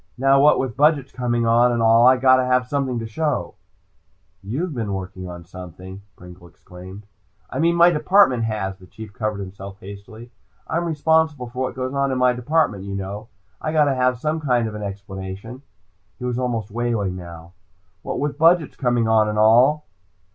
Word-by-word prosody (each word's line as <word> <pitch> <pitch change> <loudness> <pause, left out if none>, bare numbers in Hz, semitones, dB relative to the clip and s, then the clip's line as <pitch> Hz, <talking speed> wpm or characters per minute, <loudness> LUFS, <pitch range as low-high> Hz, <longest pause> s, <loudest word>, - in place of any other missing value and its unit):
Now 135 +1 +4
what 150 +1 +5
with 130 -3 -3
budgets 145 -1 +2
coming 120 -2 -1
on, 120 +2 +4
and 120 - -1
all, 115 +1 +5
I 130 0 +6
gotta 130 0 +4
have 125 0 +1
something 135 -2 -2
to 115 - -4
show!" 150 +7 -2 0.9
"You've 140 - -4
been 110 -6 -3
working 95 -1 -7
on 85 -1 -10
something 90 +2 -11
" 100 - -43
Pringle 90 0 -14
exclaimed. 90 +4 -13 0.5
"I 130 - -4
mean 170 +2 +2
my 170 +1 +6
department 150 - +3
has," 95 -4 -4
the 95 - -16
Chief 110 +1 -11
covered 105 -3 -3
himself 95 0 -9
hastily. 100 +4 -11 0.4
"I'm 170 +2 -1
responsible 160 -4 +1
for 125 +1 -5
what 125 - -6
goes 130 0 -4
on 140 -1 0
in 130 - -1
my 125 0 +3
department, 125 -5 0
you 100 0 -6
know. 100 +3 -6 0.3
I 155 - -2
gotta 150 -3 +3
have 125 -1 +1
some 155 +5 -2
kind 125 -6 0
of 110 - -7
an 105 - -7
explanation." 100 +4 -7 0.6
He 125 - -7
was 125 0 -2
almost 115 -4 -3
wailing 115 -5 -2
now. 85 -2 -10 0.5
"What - - -4
with 145 0 -3
budgets 165 0 +3
coming 120 -3 +1
on, 110 -1 +3
and 105 - -3
all." 120 +8 +4
120 Hz, 185 wpm, -21 LUFS, 100-135 Hz, 0.9 s, I